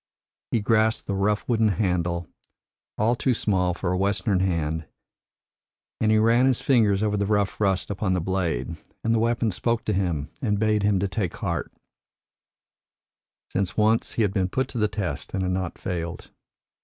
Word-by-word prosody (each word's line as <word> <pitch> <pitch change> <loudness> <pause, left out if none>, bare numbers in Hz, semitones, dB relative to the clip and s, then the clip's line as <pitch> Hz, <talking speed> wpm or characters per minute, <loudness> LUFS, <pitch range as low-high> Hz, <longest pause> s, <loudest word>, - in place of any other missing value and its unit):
He 115 - +1
grasped 110 +1 +2
the 100 - -2
rough 100 +2 0
wooden 115 -2 +3
handle, 90 -4 0 0.7
all 110 +3 +3
too 125 +1 +1
small 90 -5 +1
for 90 - -2
a 90 - 0
Western 100 0 +1
hand, 80 -4 -1 1.1
and 110 - +2
he 110 - +5
ran 115 +4 +4
his 130 -2 +2
fingers 110 -7 +3
over 105 -1 +1
the 100 -1 0
rough 105 -1 0
rust 95 -1 +1
upon 95 -1 -1
the - - +1
blade, 85 -5 -2 0.3
and 115 - +2
the 115 - +2
weapon 115 -1 +1
spoke 115 +4 -1
to 105 - 0
him 85 -7 -1
and 105 -1 +1
bade 105 0 +2
him 100 -1 +2
take 95 -1 -2
heart, - - -3 1.8
since 95 -1 -1
once 110 +1 +2
he 115 - +1
had 100 -2 0
been 95 -1 0
put 130 +6 -1
to 120 - -4
the 105 - +3
test 100 -2 -4
and 95 - -1
had 90 - 0
not 90 -2 -2
failed. 85 -1 -5
100 Hz, 175 wpm, -25 LUFS, 90-110 Hz, 1.8 s, he